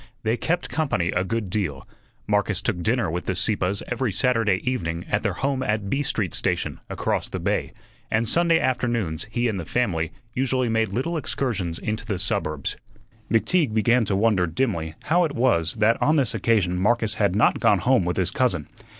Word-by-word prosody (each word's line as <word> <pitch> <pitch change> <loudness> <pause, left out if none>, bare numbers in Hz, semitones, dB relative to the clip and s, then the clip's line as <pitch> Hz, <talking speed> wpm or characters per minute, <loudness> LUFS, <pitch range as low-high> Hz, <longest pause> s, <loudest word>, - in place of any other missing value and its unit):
They 110 +1 +1
"kept 175 +8 -1
company" 135 - 0
a 90 - 0
good 105 -1 -3
deal; 85 -10 -2 0.4
Marcus 105 -2 +1
took 90 -2 -2
dinner 115 -2 +1
with 90 +2 -3
the 95 - 0
Sieppes 100 0 0
every 125 -2 -1
Saturday 110 -2 +2
evening 85 -9 -2
at - - +2
their 100 -4 -1
home 135 +6 -1
at 105 -4 -1
B 140 - +1
Street 110 - -1
station, - - -1
across - - -1
the - - -4
bay, - - -1 0.4
and 110 +1 +1
Sunday 170 +4 +3
afternoons 115 - -1
he 120 +2 0
and 105 -4 -2
the - - -4
family 80 -5 -1 0.2
usually 130 -1 +1
made 110 -1 +1
little 135 - -2
excursions 105 - -2
into 110 +1 -4
the 100 -4 -1
suburbs. 90 -7 -2 0.5
McTeague 115 +2 +2
began 115 +3 +3
to 100 - 0
wonder 100 -3 +2
dimly 80 -4 -2
how 175 +3 +3
it 150 -4 -2
was 85 - +2
that 110 +2 +2
on 155 - +3
this 135 -7 +2
occasion 95 -6 +1
Marcus 110 +2 +2
had 100 -3 +1
not 105 - +3
gone 105 - +4
home 120 +4 +3
with 90 +1 -2
his 95 -2 +1
cousin. 95 - 0
110 Hz, 185 wpm, -24 LUFS, 90-125 Hz, 0.5 s, gone